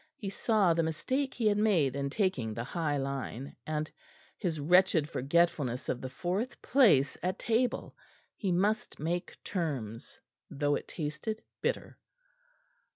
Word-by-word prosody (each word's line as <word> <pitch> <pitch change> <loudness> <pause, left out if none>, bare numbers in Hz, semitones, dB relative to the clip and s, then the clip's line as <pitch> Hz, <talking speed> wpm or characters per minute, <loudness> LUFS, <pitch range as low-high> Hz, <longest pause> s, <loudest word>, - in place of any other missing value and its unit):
He 195 -2 -5
saw 200 -4 +3
the 165 - +2
mistake 260 - -1
he 235 - -1
had 210 -1 +4
made 175 -12 +3
in 140 0 -1
taking 140 - 0
the 115 - -3
high 150 +2 -1
line, 135 -1 -4
and 155 0 -2 0.4
his 170 -6 -2
wretched 170 0 +4
forgetfulness 145 -4 +1
of 125 - -1
the 130 - -4
fourth 185 - -2
place 195 - +4
at 185 +2 -1
table. 235 +2 0 0.4
He 195 -4 -1
must 205 +5 0
make 175 +4 -2
terms, 135 - -4 0.3
though 145 0 0
it - - -2
tasted 155 +8 -4 0.2
bitter. - - -2
165 Hz, 140 wpm, -31 LUFS, 140-200 Hz, 0.4 s, had